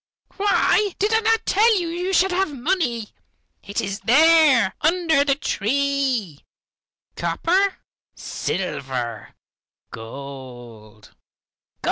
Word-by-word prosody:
Why, 400 0 +2
did 420 +3 0
I 445 - +4
not 450 0 +1
tell 430 +1 +3
you 345 - -3
you 355 +3 -3
should 380 +1 +3
have 375 -2 0
money. 245 - -1 0.5
It 200 - -4
is 195 +1 -4
there, 290 -5 +4
under 325 -3 +2
the 280 -1 +1
tree, 265 - -1 0.7
copper, 380 +3 0 0.4
silver, 130 - -4 0.6
gold. 120 -3 -11
280 Hz, 95 wpm, -22 LUFS, -, 0.7 s, I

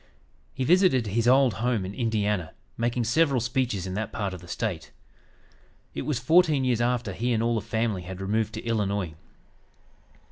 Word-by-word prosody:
He 130 - -2
visited 175 - +4
his 115 +3 0
old 130 -1 +5
home 120 -5 0
in 95 - -6
Indiana, 105 -7 -1 0.2
making 120 +1 -1
several 135 +3 +2
speeches 120 -5 -1
in 95 - -5
that 110 +2 -3
part 100 -3 -3
of 90 - -8
the 90 - -13
State. 90 -1 -3 1.0
It - - -5
was 150 -5 0
fourteen 155 +2 +4
years 125 -2 +1
after 120 -4 0
he 120 +6 -1
and 115 0 +1
all 120 0 +1
the 110 - 0
family 110 -2 -1
had 90 +1 -8
removed 110 +2 -1
to 110 - -6
Illinois. 100 -6 -1
115 Hz, 175 wpm, -26 LUFS, 100-125 Hz, 1.0 s, old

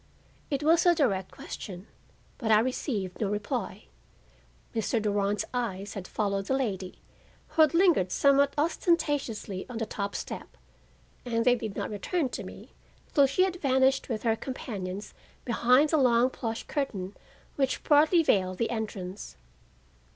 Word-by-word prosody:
It 285 0 -1
was 330 +3 +4
a 350 - +6
direct 195 - +1
question, 185 -1 -8 0.5
but 225 -4 0
I 215 - +7
received 220 - -2
no 205 - +1
reply. 205 0 -3 0.9
Mr. 225 +1 0
Durand's 205 -1 0
eyes 205 -5 -3
had 190 -3 -6
followed 200 -2 -2
the 265 - +1
lady, 195 -8 -3 0.5
who 320 - +2
had 310 +1 +5
lingered 335 - +4
somewhat 280 +3 +3
ostentatiously 290 - 0
on 245 - -6
the 225 - -1
top 200 -2 -4
step - - -6 0.7
and 230 -2 -1
they 250 - +6
did 220 -5 -4
not - - -3
return 270 - -1
to - - -5
me - - -11 0.4
till 280 -2 +6
she 275 +8 +2
had 370 -1 -1
vanished 265 -3 +2
with 220 -3 -3
her 225 -2 +2
companions 205 -6 -6 0.3
behind 250 +5 +4
the 315 - +3
long 250 -2 +4
plush 225 -3 -4
curtain 205 -10 -3 0.4
which 270 -1 0
partly 310 +3 +5
veiled 185 -8 +2
the 230 - -1
entrance. 205 - -5
235 Hz, 150 wpm, -28 LUFS, 200-280 Hz, 0.9 s, I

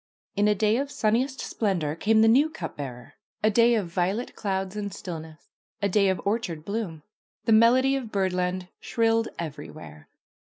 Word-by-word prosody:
In 205 +1 +3
a 210 - +3
day 215 +2 +2
of 275 +1 -2
sunniest 255 +3 0
splendor 175 -9 -1
came 220 +5 +3
the - - +6
new 275 +7 +5
cup 315 - -7
bearer, 125 -4 -8 0.3
a 215 - +4
day 235 +2 +5
of 210 -4 0
violet 185 +7 -2
clouds 195 -1 -2
and 205 -1 -3
stillness, 160 -4 -8 0.3
a 200 - +1
day 200 0 +3
of 190 -2 0
orchard 200 -7 -2
bloom. 200 -8 -4 0.4
The - - +2
melody 250 +5 +5
of 250 -5 -4
bird! 190 -2 0
and 180 0 -1
shrilled 225 -1 +1
everywhere. 155 - -8
205 Hz, 170 wpm, -26 LUFS, 180-225 Hz, 0.4 s, the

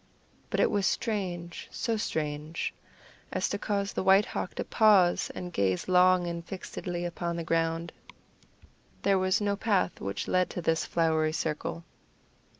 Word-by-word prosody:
But - - -1
it - - +4
was 200 -2 +2
strange 180 -6 -2
so 230 -2 -1
strange 155 -5 -3 0.6
as - - 0
to - - -2
cause 200 -1 -1
the - - -1
White 195 +2 +5
Hawk - - -4
to - - -2
pause 200 -6 +4
and 180 -1 -6
gaze 95 - 0
long 185 0 +5
and 170 -1 -4
fixedly 175 -1 -5
upon 170 0 -3
the 170 - -3
ground 165 +1 0 1.1
there 195 -1 +3
was 185 +3 +2
no 205 -1 0
path 200 -4 0
which 100 0 -3
led 185 0 +2
to 175 - -4
this 160 0 +1
flowery 160 -2 +1
circle. 160 +2 -3
175 Hz, 150 wpm, -29 LUFS, 165-195 Hz, 1.1 s, White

